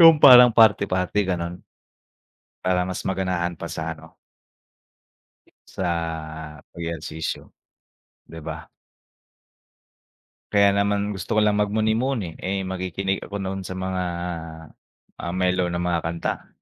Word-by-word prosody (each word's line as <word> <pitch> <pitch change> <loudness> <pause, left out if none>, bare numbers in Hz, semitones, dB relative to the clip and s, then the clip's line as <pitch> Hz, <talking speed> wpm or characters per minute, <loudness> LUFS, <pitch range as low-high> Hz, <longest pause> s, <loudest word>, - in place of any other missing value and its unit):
Yung 165 -2 +8
parang 125 -3 +10
party 105 -3 +5
party 90 +2 0
gano'n. 90 -1 -2 1.1
Para 90 -1 +2
mas 95 - -4
maganahan 90 -2 -1
pa 85 - -5
sa 80 0 -3
ano 80 +1 -16 1.5
sa 90 -2 -2 0.9
ehersisyo, 80 -1 -5 0.7
'di 80 -1 -10
ba? - - -7 1.8
Kaya 100 -1 +6
naman 100 +1 +1
gusto 95 +2 -3
ko - - +5
lang 105 0 +2
mag 105 - +2
muni-muni, 110 -2 0
eh, 95 +1 -2
makikinig 95 +1 -2
ako 100 - -7
noon 95 0 -3
sa 95 - -5
mga, 95 0 -2 1.2
ah, 85 - -4
melow 90 -1 +1
na 85 - -3
mga 85 -1 0
kanta. 85 +1 -3
95 Hz, 120 wpm, -24 LUFS, 85-100 Hz, 1.8 s, parang